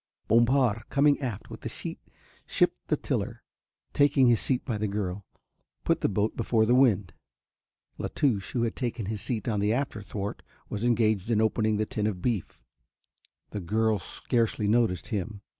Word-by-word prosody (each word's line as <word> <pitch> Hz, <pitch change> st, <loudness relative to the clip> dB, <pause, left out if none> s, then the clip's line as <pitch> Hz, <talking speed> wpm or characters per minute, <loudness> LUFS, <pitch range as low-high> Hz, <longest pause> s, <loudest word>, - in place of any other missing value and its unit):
Bompard 120 Hz, -1 st, +3 dB
coming 145 Hz, +1 st, +3 dB
aft 120 Hz, -7 st, -5 dB
with -, -, -8 dB
the -, -, -4 dB
sheet -, -, -6 dB, 0.5 s
shipped -, -, +1 dB
the -, -, +1 dB
tiller, -, -, -1 dB
and, -, -, -19 dB
taking 145 Hz, -2 st, +4 dB
his 120 Hz, -3 st, +5 dB
seat 130 Hz, -2 st, 0 dB
by 115 Hz, -5 st, -2 dB
the 105 Hz, -, 0 dB
girl, 100 Hz, -1 st, -3 dB, 0.6 s
put -, -, +1 dB
the -, -, +2 dB
boat 105 Hz, +2 st, 0 dB
before 115 Hz, -1 st, +2 dB
the 120 Hz, -, +3 dB
wind. 110 Hz, -8 st, +3 dB, 0.9 s
La -, -, -2 dB
Touche, 105 Hz, -9 st, 0 dB
who 120 Hz, -, +1 dB
had 115 Hz, -, -1 dB
taken 120 Hz, -4 st, -3 dB
his 105 Hz, 0 st, -3 dB
seat 110 Hz, -2 st, -2 dB
on 105 Hz, -3 st, 0 dB
the 105 Hz, +1 st, +2 dB
after 120 Hz, -3 st, -1 dB
thwart, 100 Hz, 0 st, -5 dB, 0.3 s
was 105 Hz, +1 st, -3 dB
engaged 110 Hz, -4 st, +2 dB
in 110 Hz, -2 st, +3 dB
opening 110 Hz, -1 st, +2 dB
the 110 Hz, -, +1 dB
tin 105 Hz, 0 st, -2 dB
of 100 Hz, -4 st, -2 dB
beef. 110 Hz, -3 st, -2 dB, 0.9 s
The 105 Hz, -, -4 dB
girl 110 Hz, +3 st, +1 dB
scarcely 110 Hz, +3 st, -1 dB
noticed 105 Hz, -6 st, +1 dB
him. 100 Hz, 0 st, -3 dB
110 Hz, 175 wpm, -28 LUFS, 105-120 Hz, 0.9 s, his